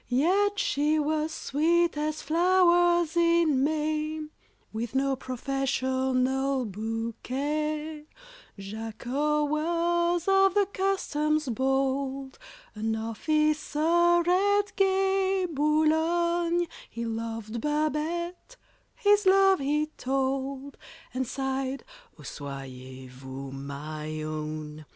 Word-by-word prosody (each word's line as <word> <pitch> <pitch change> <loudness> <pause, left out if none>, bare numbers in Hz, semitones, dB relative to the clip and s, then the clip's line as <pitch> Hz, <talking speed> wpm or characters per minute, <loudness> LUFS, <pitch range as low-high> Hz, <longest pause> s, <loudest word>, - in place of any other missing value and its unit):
Yet 380 +11 +2
she 310 -11 +1
was 310 +1 0
sweet 335 +3 +1
as 305 +1 -2
flowers 345 0 +3
in 335 -5 +3
May, 310 +1 -1 0.5
With 230 +3 -4
no 270 0 +2
professional 260 0 -1
bouquet. 280 +9 -3 0.5
JACOT 240 +9 -2
was, 340 +3 0
of 390 0 +4
the 405 -1 +4
Customs 305 -6 0
bold, 270 - -1 0.3
An 220 +1 -2
officer, 305 +8 +2
at 405 +2 +2
gay 385 -1 +2
Boulogne, 335 +3 +2 0.2
He 235 +1 -5
loved 225 0 -4
BABETTE—his 345 +8 -1
love 390 -1 +5
he 295 +2 +1
told, 270 +1 -2 0.4
And 260 0 -2
sighed, 270 +1 -3 0.3
"Oh, 150 - -14
soyez 130 -2 -8
vous 130 +1 -8
my 150 +3 -6
own!" 155 0 -5
300 Hz, 85 wpm, -27 LUFS, 250-340 Hz, 0.5 s, love